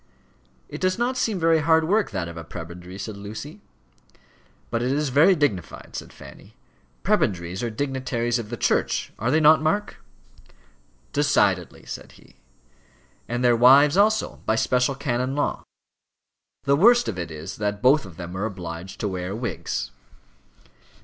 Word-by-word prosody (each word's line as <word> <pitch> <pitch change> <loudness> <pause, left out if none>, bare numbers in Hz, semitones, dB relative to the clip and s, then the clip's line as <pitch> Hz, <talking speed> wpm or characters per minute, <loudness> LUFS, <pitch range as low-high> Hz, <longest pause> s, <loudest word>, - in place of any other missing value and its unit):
"It - - -8
does 185 0 +1
not 245 +2 0
seem 220 -6 -1
very 165 -1 +3
hard 160 +1 +3
work, 205 +3 +2
that 90 -4 -3
of 85 - -8
a 80 - -7
prebendary," 85 +3 -9
said 105 +2 -6
Lucy. 110 - -8 1.1
"But 115 0 0
it 125 +2 0
is 145 +1 0
very 150 +8 +5
dignified," 135 - -2
said - - -7
Fanny. - - -14 0.5
"Prebendaries 90 -1 0
are 120 - -1
dignitaries 125 -1 -2
of 110 -3 -7
the 120 - -5
Church - - 0
are 115 - 0
they 155 +4 +3
not, 155 +1 +6
Mark?" 200 +7 -1 1.1
"Decidedly," 105 - +1
said - - -8
he; - - -21 0.9
"and 120 +1 -2
their 120 -1 +5
wives 135 +5 +6
also, 215 +2 +2
by 110 - +3
special 125 +3 +1
canon 130 0 -2
law. 145 - -1 1.0
The 140 0 +3
worst 240 +9 +5
of 95 - -3
it 85 -1 -4
is 80 +3 -8
that 105 -1 -3
both 135 +4 +5
of 90 -5 -12
them 90 0 -7
are 100 +3 -2
obliged 90 -2 -7
to 105 - 0
wear 90 0 -4
wigs." 115 -6 -4
120 Hz, 155 wpm, -24 LUFS, 95-150 Hz, 1.1 s, not